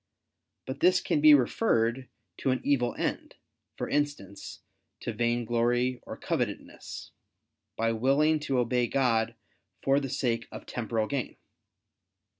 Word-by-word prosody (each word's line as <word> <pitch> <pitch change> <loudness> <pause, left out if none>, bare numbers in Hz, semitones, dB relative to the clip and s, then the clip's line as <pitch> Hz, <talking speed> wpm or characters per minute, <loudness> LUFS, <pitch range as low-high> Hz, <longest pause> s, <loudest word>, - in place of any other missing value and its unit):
But 130 +1 -5
this 185 +3 +5
can 300 - 0
be 305 -1 +9
referred 125 - +1 0.3
to - - -1
an 130 - +1
evil 125 -4 +1
end, - - -3 0.4
for - - -3
instance, 145 -10 -3 0.4
to 120 - -3
vainglory 120 +2 +1
or - - -6
covetousness, - - -4 0.6
by 115 0 +1
willing 140 +7 +3
to 140 -3 -1
obey 125 0 +1
God 115 -3 +1 0.5
for 135 +1 +4
the 135 -2 -4
sake 120 -4 -1
of - - -9
temporal 115 -2 -2
gain. 135 +1 -3
125 Hz, 125 wpm, -28 LUFS, 115-140 Hz, 0.6 s, be